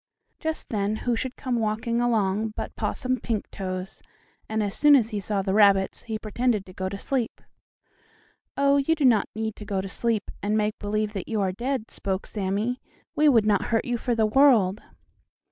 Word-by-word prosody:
Just 320 -1 -4
then 205 -1 0
who 240 +2 -1
should 255 +2 -4
come 250 -3 -2
walking 225 +2 -1
along 215 -2 +1
but - - -5
Possum 255 -2 -1
Pinktoes, 190 -4 -4 0.5
and, 220 0 0
as 200 -1 -2
soon 295 +3 +6
as 235 -4 +2
he 210 - -2
saw 200 0 -1
the 190 0 -1
rabbits, 200 -2 +4
he 220 -1 -4
pretended 215 -1 -1
to 185 - -13
go 185 0 -3
to 200 - -5
sleep. 250 +2 -2 1.2
"Oh, 280 0 +4
you 285 +4 +2
do 300 -3 +1
not 230 -5 +4
need 220 -1 -3
to - - -8
go 205 -2 -2
to 190 - -3
sleep, 220 +1 -2
and 210 +1 0
make 215 0 -1
believe 210 +1 -1
that 195 -4 -5
you 220 -2 -1
are 190 -1 +1
dead," 240 +3 -3
spoke 190 0 -3
Sammie. 210 +5 -2 0.3
"We 300 0 +5
would 230 -6 +4
not 205 -2 +2
hurt 225 -1 0
you 245 -1 -1
for 240 0 0
the 220 -1 +3
world." 215 -5 +4
215 Hz, 195 wpm, -25 LUFS, 200-240 Hz, 1.2 s, soon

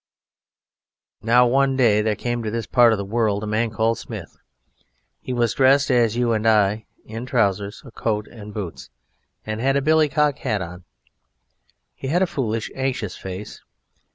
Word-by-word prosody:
Now, 120 +2 +4
one 135 +2 +2
day 110 -5 +4
there 105 0 0
came 120 +1 -3
to 110 - -3
this 115 +1 -3
part 120 -2 +5
of 110 - +1
the 100 - -4
world 105 -1 0
a - - -2
man 110 +2 0
called 110 +1 0
Smith. - - -8 0.8
He - - -7
was 120 -3 +1
dressed 135 +1 +4
as 120 -2 +2
you 120 -1 +2
and 110 0 0
I 105 -3 +4
are, 110 +1 -10 0.2
in 115 +3 -7
trousers 100 -4 0
and 135 - -12
a - - -17
coat 105 -2 -2
and 105 -3 -11
boots, 100 -6 -7 0.6
and 110 0 -4
he 120 - -3
had 135 - +3
a - - +1
billycock 150 -1 +2
hat 105 - -1
on. 90 +1 -10 1.1
He 135 - -7
had 175 +7 +2
a - - +4
foolish, 115 -10 -3
anxious 130 -8 -2
face. 95 +2 -8
115 Hz, 180 wpm, -22 LUFS, 105-130 Hz, 1.1 s, part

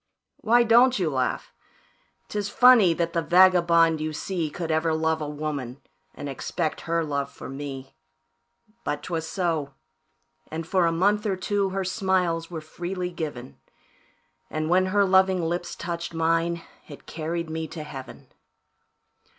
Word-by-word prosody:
"Why 240 +2 +4
don't 240 +3 +5
you 175 -6 0
laugh? 130 -2 -2 0.7
'Tis 205 -1 -3
funny 245 -6 +6
that 170 0 -1
the 170 - +1
vagabond 170 -2 +4
you 155 0 -3
see 170 0 -3
Could 165 +2 -4
ever 160 0 +1
love 160 0 0
a 150 - -3
woman, 145 -4 -4 0.4
and 145 - -6
expect 155 +4 -3
her 165 0 +1
love 140 -2 -2
for - - -10
me; 135 -1 -7 0.9
But 150 - -3
'twas 160 -2 -3
so, 160 -6 -2 0.7
and 160 +1 -5
for 180 0 +2
a - - +2
month 205 +5 +1
or 195 - 0
two, 200 +1 -1
her 190 0 -2
smiles 180 -3 0
were 165 -3 -6
freely 180 +3 -5
given, 145 -7 -6 0.9
And 155 +1 -2
when 185 +1 +4
her 200 +1 +3
loving 190 -1 +3
lips 175 +2 -3
touched 170 0 -5
mine, 165 +1 +1 0.2
it 145 - -12
carried 165 +1 -4
me 160 0 -3
to 155 0 -7
Heaven. 135 -3 -10
165 Hz, 150 wpm, -25 LUFS, 155-185 Hz, 0.9 s, funny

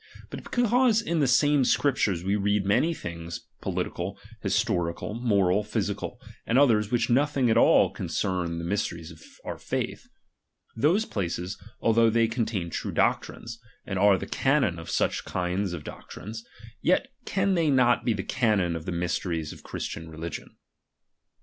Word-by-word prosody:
But - - -7
because 245 -1 +3
in 170 -7 -1
the 140 - +3
same 145 +2 +4
Scriptures 110 - +1
we 100 +2 +1
read 105 0 +1
many 105 +12 +3
things 85 - -6 0.2
politi - - -2
cal, - - -4 0.2
historical, 85 +4 -1
moral, 105 -4 +2
physical, 105 - -3 0.3
and 115 - +2
others 110 -7 +4
which 120 0 +1
nothing 135 -1 +3
at - - +3
all - - +5
concern 90 -3 -2
the 85 - -4
mysteries 85 -3 -2
of 80 -1 -14 0.2
our - - -5
faith; - - -3 0.7
those 170 - +2
places, 90 0 -3 0.3
although 115 0 +4
they 115 0 +3
contain 110 -7 -2
true - - -3
doctrine, - - 0 0.4
and 95 -2 -3
are 100 -1 +5
the - - -5
canon 135 - +1
of 80 - -9
such - - 0
kind 90 +2 -2
of 85 -4 -6
doctrines, 110 +8 -8 0.4
yet - - +2 0.2
can 195 0 +1
they 165 -4 +2
not 125 -3 +4
be 115 - +2
the 100 -2 -3
canon 105 -8 +1
of 80 -1 -6
the - - -3
mysteries 85 -2 -2
of - - -14
Christian 80 0 -6
religion. 80 +1 -7
105 Hz, 155 wpm, -27 LUFS, 85-130 Hz, 0.7 s, all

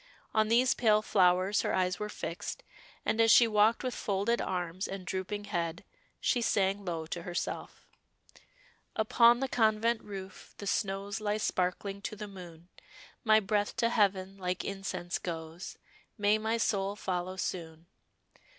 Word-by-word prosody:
On 215 -1 +3
these 240 +3 +4
pale 215 -2 +3
flowers 185 0 +3
her - - 0
eyes 180 -1 0
were 210 0 -3
fixed, 170 - -5 0.4
and 225 - +2
as 225 - +5
she 235 +1 +8
walked 215 +1 +3
with 255 -1 -2
folded 205 +4 0
arms 180 0 -2
and 195 -1 -6
drooping 190 +3 -3
head, 170 -3 -3 0.4
she 245 - +1
sang 200 -3 +1
low 165 -3 -3
to 170 +2 -5
herself 175 +1 -5 1.1
'Upon 235 +3 +5
the 270 - +1
convent 225 -1 +2
roof, 190 -2 -9
the 200 - -7
snows 200 +1 -1
Lie 210 0 0
sparkling 195 0 -1
to 215 - -5
the 210 0 -6
moon; 175 -3 -11 0.5
My 220 -2 +6
breath 205 0 0
to 230 - +2
heaven 195 -3 +1
like 180 -1 -2
incense 195 -3 -3
goes, 165 0 -6 0.4
May 210 0 +3
my 220 +1 0
soul 200 -3 0
follow 185 -2 -3
soon. 165 -3 -5
200 Hz, 150 wpm, -31 LUFS, 185-215 Hz, 1.1 s, she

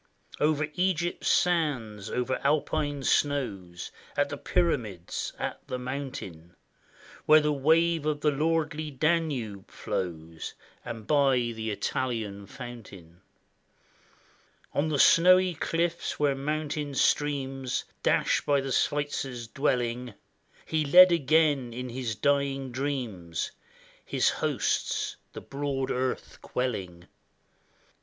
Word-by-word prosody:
Over 150 0 +2
Egypt's 175 -1 0
sands, 130 - +1
over 125 +1 -1
Alpine 145 -1 0
snows, 105 -14 0 0.3
At - - +2
the - - -4
Pyramids, 90 0 -1
at - - -3
the 130 - -3
mountain, 125 - -6 0.7
Where 155 0 +8
the 150 0 +1
wave 160 +2 +3
of 150 -1 -1
the 150 - +3
lordly 155 +1 0
Danube 140 - -1
flows. 80 -3 -5 0.3
And 115 -2 -7
by 140 -1 +4 0.2
the 110 0 -4
Italian 105 -2 -3
fountain; 95 -8 -10 1.5
On 145 +2 +1
the 150 - 0
snowy 185 +5 +6
cliffs, 170 +2 -1
where 145 -2 +3
mountain 145 0 -3
streams 135 -3 0 0.2
Dash - - +2
by 145 -1 +3
the 135 0 -3
Switzer's 135 -4 -1
dwelling. 125 -3 -1 0.5
He 155 -1 0
led 180 +5 +8
again, 150 -5 +2
in 125 +1 -5
his 120 -2 -3
dying 135 +2 0
dreams, 120 - -3 0.5
His - - +2
hosts, - - 0 0.2
the - - -7
broad 140 -1 -3
earth 130 0 -2
quelling. 95 -9 -3
135 Hz, 105 wpm, -28 LUFS, 115-150 Hz, 1.5 s, Where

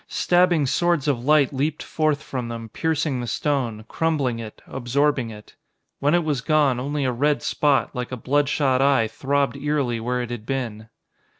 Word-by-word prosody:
Stabbing 175 -4 +3
swords 165 +2 +1
of 125 -5 0
light 150 -1 +3
leaped 145 +3 -1
forth 155 -2 0
from 125 -3 -4
them, 115 -1 -6
piercing 150 -1 -1
the 120 - -5
stone, 120 -4 -1
crumbling 140 -7 0
it, 110 -2 -9
absorbing 135 0 0
it. 105 -1 -12 0.4
When 145 +4 +3
it 175 - +2
was 150 -5 -1
gone, 145 -3 +2
only 140 +2 -2
a 130 - +1
red 145 +5 +1
spot, 145 -3 +1
like 125 -2 -4
a 130 - -4
bloodshot 135 0 +1
eye, 135 -5 +3
throbbed 140 +5 -1
eerily 140 -5 -1
where 125 +2 -1
it 120 - -7
had 115 -2 -6
been. 115 -5 -4
135 Hz, 175 wpm, -23 LUFS, 120-150 Hz, 0.4 s, Stabbing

